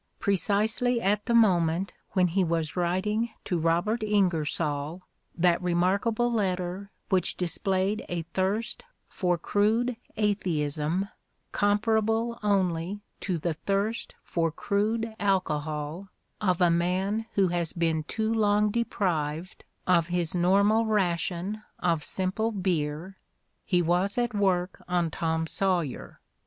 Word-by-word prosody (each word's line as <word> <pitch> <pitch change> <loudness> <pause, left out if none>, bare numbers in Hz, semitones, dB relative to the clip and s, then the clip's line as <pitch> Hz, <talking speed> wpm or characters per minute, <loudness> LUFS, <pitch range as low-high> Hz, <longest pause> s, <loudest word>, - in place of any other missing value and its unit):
Precisely 215 +5 +1
at 210 +1 0
the 235 - +1
moment 180 -4 +3 0.2
when 185 -2 +3
he 190 +3 +2
was 165 -3 -1
writing 190 +6 0 0.2
to 175 - 0
Robert 175 +8 +1
IngersoU 165 -6 0 0.4
that 175 0 +3
remark 180 +4 +1
able 240 +2 +1
letter 185 -2 -1 0.2
which 185 -3 +1
displayed 190 +4 0
a 175 -2 -2
thirst 195 +4 -1 0.2
for 180 -2 0
crude 220 +8 +1 0.2
atheism 175 -4 0 0.4
comparable 220 +3 +1
only 190 -2 0 0.2
to 185 -3 -2
the 165 +1 -1
thirst 200 +7 -2
for 165 -2 0
crude 220 +6 -1
alcohol 155 -3 -1 0.3
of 185 -3 +1
a 175 -1 +5
man 190 +6 0
who 195 -2 +3
has 170 -2 -1
been 165 -2 0
too 220 +4 -1
long 210 -1 +3
deprived 180 -7 -2 0.2
of 170 -2 +3
his 175 -2 -1
normal 200 +5 +4
ration 195 -1 -1 0.2
of 170 -4 0
simple 190 +7 -1
beer, 180 -2 -2 0.4
he 180 -3 +2
was 180 +5 +1
at 240 -2 0
work 190 -3 0
on 175 -2 0
"Tom 160 0 -1
Saw 185 +1 +1
yer." 145 -6 -7
185 Hz, 120 wpm, -27 LUFS, 170-210 Hz, 0.4 s, a